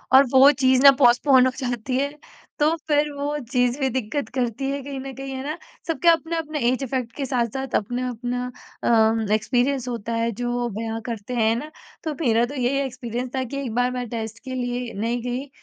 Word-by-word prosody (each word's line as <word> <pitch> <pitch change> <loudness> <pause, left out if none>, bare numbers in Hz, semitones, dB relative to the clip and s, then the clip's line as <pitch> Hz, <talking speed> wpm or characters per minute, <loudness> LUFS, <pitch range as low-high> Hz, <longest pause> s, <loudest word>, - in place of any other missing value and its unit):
और 275 - +8
वो 270 +2 +8
चीज़ 260 -2 +3
ना 275 - +11
पोस्टपोन 255 +2 +6
हो 260 - +2
जाती 250 -1 -2
है, 280 +1 0 0.5
तो 305 +2 +3
फिर 295 -1 +2
वो 285 +1 -2
चीज़ 250 +1 +2
भी 265 - +1
दिक्कत 255 +1 -2
करती 250 +1 -1
है 280 0 -3
कहीं 275 0 -6
न 270 0 -6
कहीं। 270 0 -6
है 265 0 -5
ना? 305 +3 -4 0.3
सब 330 - -1
के 345 - +1
अपने-अपने 325 -2 0
ऐज 255 +2 0
इफेक्ट 250 -3 -2
के 280 - -2
साथ-साथ, 255 +1 -2
अपना-अपना 245 +2 -2 0.4
अम, 225 -1 +3
एक्सपीरियंस 250 +4 +1
होता 235 -2 -4
है 230 0 0
जो 240 0 -1
बयाँ 225 0 -3
करते 230 0 -5
हैं 225 -1 +3
ना? 300 +6 -5 0.3
तो 315 -2 -2
मेरा 235 -4 +3
तो 280 +4 -8
यही 255 +1 +1
एक्सपीरियंस 245 -1 -5
था 260 - 0
कि 265 +3 -6
एक 230 - -4
बार 245 +1 +2
मैं 250 -1 -3
टेस्ट 220 -1 -5
के 260 - -6
लिए 245 -1 -3
नहीं 230 +4 -2
गई 250 +3 -3
250 Hz, 205 wpm, -23 LUFS, 235-275 Hz, 0.5 s, ना